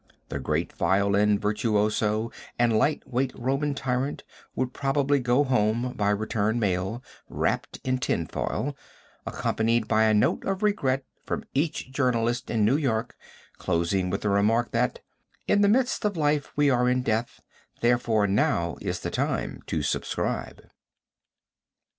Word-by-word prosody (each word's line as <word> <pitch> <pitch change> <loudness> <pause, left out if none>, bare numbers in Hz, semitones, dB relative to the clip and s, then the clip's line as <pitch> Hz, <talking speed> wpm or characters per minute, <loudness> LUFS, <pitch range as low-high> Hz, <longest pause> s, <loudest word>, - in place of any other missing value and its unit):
The 70 - -3
great 75 +5 -1
violin 100 +3 +2
virtuoso 105 +1 0 0.3
and 120 -2 +3
light 145 +8 +2
weight 130 0 0
Roman 135 +3 -1
tyrant 130 0 -2 0.3
would 130 0 -1
probably 140 0 +1
go 125 +3 +3
home 120 -1 +1
by 105 -4 0
return 110 +1 0
mail, 100 +3 -1 0.3
wrapped - - -1
in 130 0 0
tinfoil, 130 - -2 0.5
accompanied 115 0 0
by 110 +1 +3
a 110 - +4
note 105 - +2
of 195 +1 -2
regret 135 -11 +1 0.2
from - - -3
each 145 -2 -1
journalist 120 -3 0
in 110 -3 +2
New 130 +7 +3
York, 120 -5 -1 0.4
closing 90 +2 0
with 100 +2 -2
the 105 - 0
remark, 110 +4 +2
that 120 +1 0 0.5
"in 205 - +3
the 200 - +5
midst 250 +3 +2
of 205 -4 0
life 150 -2 +1
we 145 -1 +3
are 125 0 +3
in 125 0 +1
death, 115 0 -1 0.4
therefore 120 -3 +2
now 85 -4 +1
is - - -3
the - - -3
time - - -2
to - - -1
subscribe." - - -2
120 Hz, 140 wpm, -26 LUFS, 105-135 Hz, 0.5 s, the